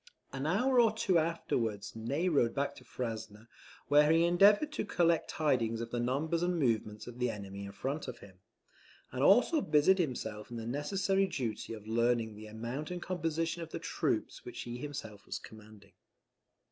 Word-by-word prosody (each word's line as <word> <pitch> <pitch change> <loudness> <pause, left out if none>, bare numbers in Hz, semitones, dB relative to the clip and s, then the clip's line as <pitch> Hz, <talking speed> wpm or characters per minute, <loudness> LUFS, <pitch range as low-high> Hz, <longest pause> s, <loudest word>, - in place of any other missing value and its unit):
An 135 +2 -2
hour 250 +9 +3
or 230 -2 +6
two 195 -5 +2
afterwards 115 -12 -2
Ney 135 +10 -1
rode 140 -9 +2
back 140 0 0
to 130 - -13
Frasne, 110 -3 -6 0.4
where 150 +1 +5
he 165 +1 +5
endeavoured 205 - +5
to 305 - -2
collect 170 -5 +2
tidings 120 -7 +1
of 115 0 -5
the 120 - -1
numbers 145 +7 0
and 175 0 +1
movements 110 -6 0
of 120 0 -10
the 125 -1 +1
enemy 100 -2 -6
in 100 - -7
front 140 +9 -4
of 125 -2 -6
him; 95 -5 -15 0.7
and 130 - -3
also 245 - +5
busied 170 - +4
himself 110 -9 -3
in 120 - -6
the 115 - -5
necessary 195 - +1
duty 115 - -4
of 105 -2 -9
learning 115 0 +1
the 110 +1 -10
amount 120 +7 -5
and 180 -1 -5
composition 165 -1 -2
of 165 - -6
the - - -5
troops - - -2
which - - -7
he 120 0 -6
himself 115 -8 -7
was - - -3
commanding. 105 -2 -14
130 Hz, 180 wpm, -32 LUFS, 110-170 Hz, 0.7 s, or